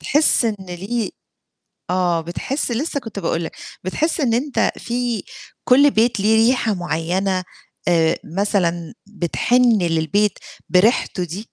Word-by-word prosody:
تحِس 295 -3 +3
إن 220 -2 0
ليه 195 +5 -4 0.8
آه، 175 -2 +1
بتحِس 240 - -3
لسه 285 +4 -1
كنت 225 -5 -7
باقول 170 -2 -1
لك، - - -7 0.3
بتحِس 315 - -1
إن 235 -4 +2
أنت 270 +4 +1
في 240 -3 -2 0.4
كل 280 +3 +5
بيت 230 -1 +2
ليه 220 +2 +4
ريحة 240 -3 +1
معيّنة 185 +2 -1 0.4
آآ، 165 -2 +3 0.2
مثلًا 175 -5 0 0.2
بتحِن 230 +5 +2
للبيت 170 +5 +1 0.3
بريحته 185 -1 +2
دي؟ 180 +5 -6
205 Hz, 125 wpm, -20 LUFS, 175-240 Hz, 0.8 s, كل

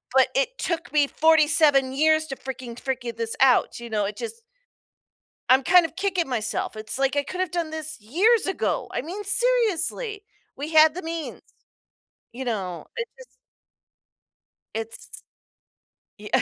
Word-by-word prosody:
but 265 - +6
it - - +2
took 335 -2 -3
me 295 -2 +4
forty-seven 305 -4 +4
years 315 +2 +3
to 270 - -5
freaking 255 -3 -7
figure 250 -3 -4
this 230 -1 -3
out, 260 -3 +4
you 235 0 -8
know? 210 -2 0
It 205 - -4
just 460 0 -6 1.1
I'm 265 +1 +5
kind 360 +4 +6
of 325 - -7
kicking 375 -4 -1
myself, 225 -3 -2
it's 215 +2 -3
like 270 +1 +1
I 285 - +1
could 365 +6 -7
have 370 -3 -1
done 340 -2 -2
this 315 -1 -6
years 380 - +2
ago! 385 - -1
I - - -1
mean, 355 +9 -6
seriously! 445 -1 +1 0.3
We 295 +3 -6
had 310 0 +7
the 365 - -6
means, 325 -1 -5 0.9
you 255 +3 -7
know? 190 -7 -3
It's 470 -1 -4
just - - -13 1.5
it's 225 0 -6 0.9
Yeah 210 0 0
310 Hz, 155 wpm, -24 LUFS, 250-360 Hz, 1.5 s, had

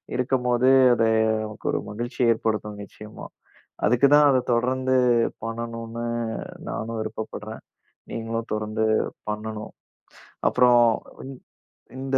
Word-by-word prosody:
இருக்கும்போது, 125 0 +1 0.2
அத 115 - +1 0.4
நமக்கு 110 0 -9
ஒரு - - 0
மகிழ்ச்சிய 120 +2 0
ஏற்படுத்தும் 105 -2 -3
நிச்சயமா. 105 +2 -11 0.6
அதுக்குதான் 140 +6 +5
அத 130 - +3 0.2
தொடர்ந்து 130 +2 +1 0.5
பண்ணணுன்னு 115 0 -5 0.7
நானும் 115 0 -4
விருப்பப்படுறேன். 110 0 -6 0.5
நீங்களும் 115 0 -4
தொடர்ந்து 110 +1 -2 0.5
பண்ணணும். 105 0 -5 0.8
அப்பறம் 120 -1 +5 0.4
இ - - -8 0.7
இந்த 135 0 -1
115 Hz, 95 wpm, -24 LUFS, 110-125 Hz, 0.8 s, அதுக்குதான்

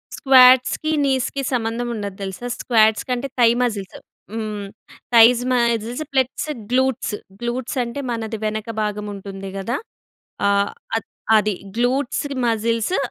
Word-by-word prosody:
స్క్వాట్స్‌కి, 255 +3 +5
నీస్‍కి 265 0 0
సంబంధం 240 0 -1
ఉండదు 200 -2 -5
తెలుసా. 190 +6 -5
స్క్వాట్స్ 220 -2 +3
కంటే 250 +2 -1
థై 235 -1 +6
మస్జిల్స్ 210 -6 -2 0.4
హ్మ్. 215 -2 -4 0.5
Thighs 235 +1 +7
muscles 235 +2 0
plus 265 +1 0 0.3
glutes. 260 -3 +1 0.3
Glutes 240 +2 -3
అంటే 235 +4 -6
మనది 225 -1 -3
వెనక 215 +1 -3
భాగం 210 0 -2
ఉంటుంది 195 -1 -8
గదా. 230 +7 -2 0.7
ఆహ్, 200 0 +2 0.3
అ - - +1 0.4
అది 210 0 +2 0.2
గ్లూట్స్ 250 +4 0 0.2
మస్జిల్సు 230 - 0
235 Hz, 120 wpm, -21 LUFS, 215-250 Hz, 0.7 s, Thighs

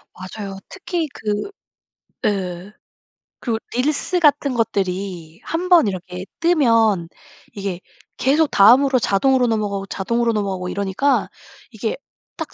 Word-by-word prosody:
맞아요. 195 +2 -7
특히 345 -3 -3
그 210 - -3 0.7
예 185 -1 -2 0.7
그 230 -3 -1 0.2
릴스 300 +8 0
같은 290 -4 +3
것들이 190 -7 -2
1 350 +3 -3
번 340 - +6
이렇게 180 -1 -5 0.2
뜨면 230 - +3 0.5
이게 195 -3 -4 0.4
계속 300 +4 +3
다음으로 255 +6 +6
자동으로 250 +5 +2
넘어가고, 205 -3 -1
자동으로 235 +5 -1
넘어가고 195 -4 -2
이러니까 200 +9 0 0.4
이게 - - -3 0.4
딱 - - -6
215 Hz, 250 characters per minute, -20 LUFS, 195-270 Hz, 0.7 s, 번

